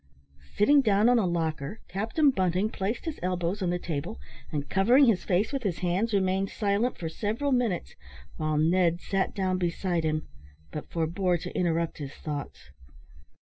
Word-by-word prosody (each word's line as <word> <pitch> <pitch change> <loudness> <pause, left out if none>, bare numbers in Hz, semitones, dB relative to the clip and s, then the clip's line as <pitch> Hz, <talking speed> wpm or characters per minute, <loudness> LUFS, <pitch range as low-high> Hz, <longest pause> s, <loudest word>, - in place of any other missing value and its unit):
Sitting 280 +7 +5
down 210 -2 +3
on 245 -1 +5
a 195 - +1
locker, 160 +1 -2
Captain 225 - +2
Bunting 185 0 0
placed 200 - -3
his 320 -3 -4
elbows 180 +2 -1
on 180 - 0
the 175 - 0
table, 150 - -4 0.3
and 145 -1 -3
covering 240 - +5
his 225 -7 +2
face 200 +8 +1
with 275 - -1
his 195 -7 -1
hands, 190 +6 +1
remained 190 -1 +1
silent 210 +4 0
for 165 - -4
several 220 - -2
minutes, 240 -8 0 0.4
while 155 -1 0
Ned 170 +2 +3
sat 195 +1 -1
down 185 -2 0
beside 175 -1 -1
him, 155 0 -1 0.4
but 150 - -6
forbore 175 +2 0
to - - -8
interrupt 170 -2 0
his 140 -1 -6
thoughts. 145 - -6
185 Hz, 165 wpm, -28 LUFS, 170-210 Hz, 0.4 s, Sitting